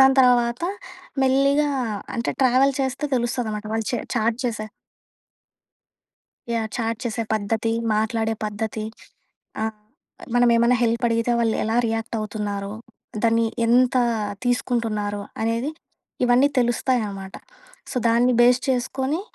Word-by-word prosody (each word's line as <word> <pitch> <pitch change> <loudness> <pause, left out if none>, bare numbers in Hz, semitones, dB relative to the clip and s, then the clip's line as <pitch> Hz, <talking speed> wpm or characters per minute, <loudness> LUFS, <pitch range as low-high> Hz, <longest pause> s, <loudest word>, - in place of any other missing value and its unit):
దాని 265 0 +7
తర్వాత 245 +1 +3 0.6
మెల్లిగా 275 +3 +3 0.5
అంటే, 235 - -1
ట్రావెల్ 260 +2 +4
చేస్తే 265 +2 -2
తెలుస్తుంది 240 -1 -1
అనమాట. 210 0 -5
వాళ్ళు 225 -1 -1
చె 245 - 0 0.2
చాట్ 225 0 +1
చేసే 215 -2 -2 1.8
యాహ్! 225 -1 0
చాట్ 230 -2 -2
చేసే 230 -1 -2
పద్ధతి, 220 +2 -1 0.2
మాట్లాడే 220 +1 0
పద్ధతి. 215 +1 -3 0.8
ఆ! - - -1 0.7
మనం 245 0 +5
ఏమన్నా 235 +2 +4
హెల్ప్ 230 +1 0
అడిగితే, 230 +1 0
వాళ్ళు 225 -1 +2
ఎలా 220 +2 0
రియాక్ట్ 225 +1 -2
అవుతున్నారో. 205 -1 -4 0.5
దాన్ని 230 0 +3 0.2
ఎంత 250 +2 +4 0.5
తీసుకుంటున్నారో, 220 -4 -1 0.2
అనేది 230 +6 0 0.5
ఇవన్నీ 250 +3 +5
తెలుస్తాయి 245 +1 +2
అనమాట. 195 -1 -8 0.6
సో, - - -7
దాన్ని 240 +2 +4
బేస్ 245 +1 +5
చేసుకొని 265 +5 0
235 Hz, 120 wpm, -23 LUFS, 220-250 Hz, 1.8 s, దాని